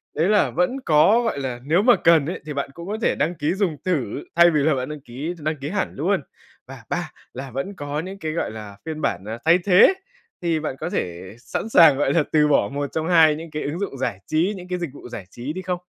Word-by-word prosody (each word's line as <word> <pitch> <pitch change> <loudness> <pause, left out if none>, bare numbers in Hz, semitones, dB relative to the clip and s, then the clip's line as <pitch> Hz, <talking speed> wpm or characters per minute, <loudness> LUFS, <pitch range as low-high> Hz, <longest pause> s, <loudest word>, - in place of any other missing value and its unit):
đấy 160 +4 +2
là 210 -1 +3
vẫn 180 +10 0
có, 165 +9 +5
gọi 230 -11 -2
là, 130 -3 -4
nếu 160 +8 +2
mà 245 +2 +6
cần 165 -3 +4
ấy 170 - -4
thì 150 - -5
bạn 140 0 -3
cũng 170 +2 -9
có 210 - -3
thể - - +2
đăng 170 +3 -1
ký 155 +1 -1
dùng 190 -6 -1
thử 145 - -1
thay 170 0 +7
vì 155 - +2
là 155 -1 +3
bạn 130 +1 -3
đăng 150 -1 -7
ký 140 +6 -5
đăng 155 +1 -2
ký 140 +1 -5
hẳn - - -2
luôn - - 0 0.5
và - - -11
ba - - -3 0.2
là 130 +1 -7
vẫn 135 - -4
có 145 -3 -4
những 190 +4 -6
cái, 155 -3 -3
gọi 165 - -2
là, 105 -2 -9
phiên 155 -1 -5
bản, 95 - -1
à, 110 +2 -5
thay 165 +2 +6
thế. 200 - +7 0.5
Thì 165 -2 0
bạn 150 -4 -4
có - - -3
thể 90 +3 -4
sẵn 215 - -4
sàng, 160 -9 +7
gọi 140 -1 +1
là, 160 -1 +3
từ 150 -1 +4
bỏ 145 - +3
một 145 0 -2
trong 160 0 -2
hai 160 -3 +5
những 165 +1 -9
cái 150 - -4
ứng 150 +5 -3
dụng 195 -9 -4
giải 120 -7 -2
trí, 170 +6 +1
những 180 -1 -10
cái 180 0 -3
dịch 170 -3 -3
vụ 125 - -11
giải 100 -5 -7
trí 125 +9 -6
đi 185 - -5
không? 180 -1 -3
155 Hz, 265 wpm, -22 LUFS, 140-175 Hz, 0.5 s, thay